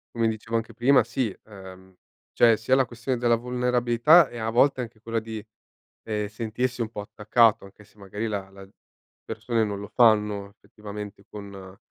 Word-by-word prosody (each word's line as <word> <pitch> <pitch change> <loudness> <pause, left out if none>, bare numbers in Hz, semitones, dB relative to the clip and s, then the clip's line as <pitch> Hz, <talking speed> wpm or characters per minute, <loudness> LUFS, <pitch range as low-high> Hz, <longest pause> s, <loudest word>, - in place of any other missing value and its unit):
come 115 -1 +1
dicevo 110 +1 -3
anche 115 - -3
prima, 125 -1 +4
sì, 120 -3 -2
ehm, 95 -2 -13 0.4
cioè, 115 -2 +5
sia 115 +4 +1
la 135 -1 +3
questione 120 +2 -4
della 120 -1 +3
vulnerabilità 125 +5 +3
e, 120 - -8
a 110 - -3
volte, 125 +3 +3
anche 115 -2 -7
quella 115 0 -2
di, 110 -1 -7 0.6
ehm, 105 -1 -2
sentirsi, 120 +4 -3
un 115 - -1
po' 105 -2 -6
attaccato, 110 +2 +2
anche 100 +2 -16
se 105 - -26
magari 105 +3 -5
la 100 -2 -4
la 95 0 -13 0.7
persone 115 -2 -1
non 100 -2 -4
lo 100 - -8
fanno, 105 -4 +3
effettivamente, 105 -1 -10
con 100 -2 -10
110 Hz, 170 wpm, -25 LUFS, 105-120 Hz, 0.7 s, cioè